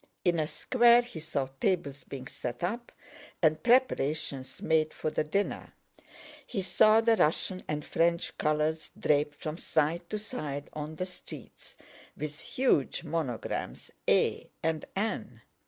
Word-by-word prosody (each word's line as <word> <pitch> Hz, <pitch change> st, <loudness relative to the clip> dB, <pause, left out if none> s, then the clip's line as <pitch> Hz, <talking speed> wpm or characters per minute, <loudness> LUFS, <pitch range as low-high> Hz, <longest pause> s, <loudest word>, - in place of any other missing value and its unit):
In 175 Hz, -2 st, +3 dB
a 155 Hz, -, +1 dB
square 240 Hz, +5 st, +5 dB
he 240 Hz, -9 st, -8 dB
saw 150 Hz, -4 st, -2 dB
tables 145 Hz, -8 st, 0 dB
being 130 Hz, -1 st, -7 dB
set 125 Hz, +2 st, -5 dB
up 235 Hz, +7 st, -2 dB, 0.5 s
and 155 Hz, -2 st, +3 dB
preparations 150 Hz, -, +1 dB
made 155 Hz, -1 st, +2 dB
for 155 Hz, -, -2 dB
the -, -, +1 dB
dinner; 195 Hz, +7 st, -2 dB, 0.7 s
he 200 Hz, -6 st, -2 dB
saw 215 Hz, +3 st, +5 dB
the 230 Hz, 0 st, +4 dB
Russian 185 Hz, +3 st, +1 dB
and 150 Hz, -1 st, -2 dB
French 170 Hz, 0 st, +1 dB
colors 155 Hz, +1 st, +1 dB
draped 150 Hz, 0 st, +2 dB
from 155 Hz, +3 st, -5 dB
side 165 Hz, +2 st, 0 dB
to 215 Hz, -, -2 dB
side 150 Hz, -, -5 dB
of 155 Hz, +1 st, -5 dB
the 185 Hz, -, -1 dB
streets, 185 Hz, -1 st, -11 dB, 0.4 s
with 150 Hz, +1 st, -5 dB
huge 250 Hz, -, +1 dB
monograms 150 Hz, -7 st, -3 dB, 0.2 s
A -, -, +2 dB
and 160 Hz, -1 st, 0 dB
N. 215 Hz, +3 st, -2 dB
160 Hz, 140 wpm, -30 LUFS, 150-195 Hz, 0.7 s, square